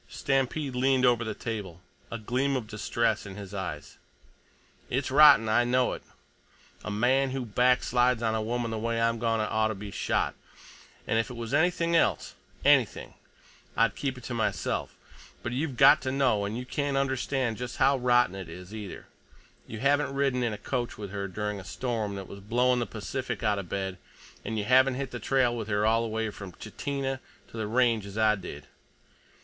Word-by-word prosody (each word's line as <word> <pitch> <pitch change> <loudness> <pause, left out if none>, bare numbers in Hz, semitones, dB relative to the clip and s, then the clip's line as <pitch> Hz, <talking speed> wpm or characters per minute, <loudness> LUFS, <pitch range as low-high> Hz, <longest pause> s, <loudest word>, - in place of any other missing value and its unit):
Stampede 135 +1 -1
leaned 130 0 +3
over 120 -1 +3
the 110 - -4
table, 100 -7 -5 0.3
a 115 - -4
gleam 130 +5 0
of 125 -4 -2
distress 110 0 -1
in 95 - -8
his 100 -1 -9
eyes. 85 -7 -6 0.9
"It's 130 +1 -1
rotten. 140 -6 +8
I 110 +3 +4
know 125 +1 +2
it. - - -7 0.8
A - - -5
man 130 +6 +2
who 130 -1 -3
backslides 125 +1 +2
on 110 -1 +1
a 110 - 0
woman 115 +1 -2
the 110 - -3
way 115 +1 -1
I'm 115 0 +1
goin' 115 -1 +1
to 110 - 0
oughta 110 0 +1
be 100 +1 -8
shot, - - 0 0.7
and 110 - +1
if 115 - -1
it 125 - -7
was 115 0 -5
anything 170 +2 +2
else—anything—I'd 115 -7 0
keep 135 -2 -3
it 125 - -11
to 125 - -5
myself. 115 -1 -2 0.5
But 120 - -3
you've 135 0 -2
got 150 - +7
to 130 - -2
know. 130 -7 +2
And 105 +3 -3
you 125 - -5
can't 140 +1 -1
understand 130 -3 0
just 125 0 -6
how 135 +1 +4
rotten 125 -5 +3
it 95 -3 -7
is, 90 +4 -10
either; 105 -4 -7 0.6
you 110 -1 -7
haven't 140 0 +2
ridden 135 -2 +1
in 120 -2 0
a 105 - -4
coach 120 +3 -3
with 100 -2 -7
her 100 -1 -3
during 105 +1 -3
a - - -9
storm 110 -1 -3
that 95 -2 -7
was 100 - -9
blowing 125 +5 +2
the 120 - -2
Pacific 115 +2 -4
outa 105 -1 +1
bed, 95 0 -4 0.4
an' 110 - -3
you 105 - 0
haven't 130 +3 +4
hit 135 -1 -4
the 120 - -5
trail 125 +1 +2
with 110 -3 -4
her 105 0 +1
all 115 +1 +3
the 115 - -2
way 110 0 -2
from 100 -3 -9
Chitina 135 - -4 0.3
to - - -12
the 110 -1 -2
Range 115 -1 +2
as 100 +1 -9
I 110 -1 +4
did. 100 -3 -7
115 Hz, 190 wpm, -28 LUFS, 105-130 Hz, 0.9 s, rotten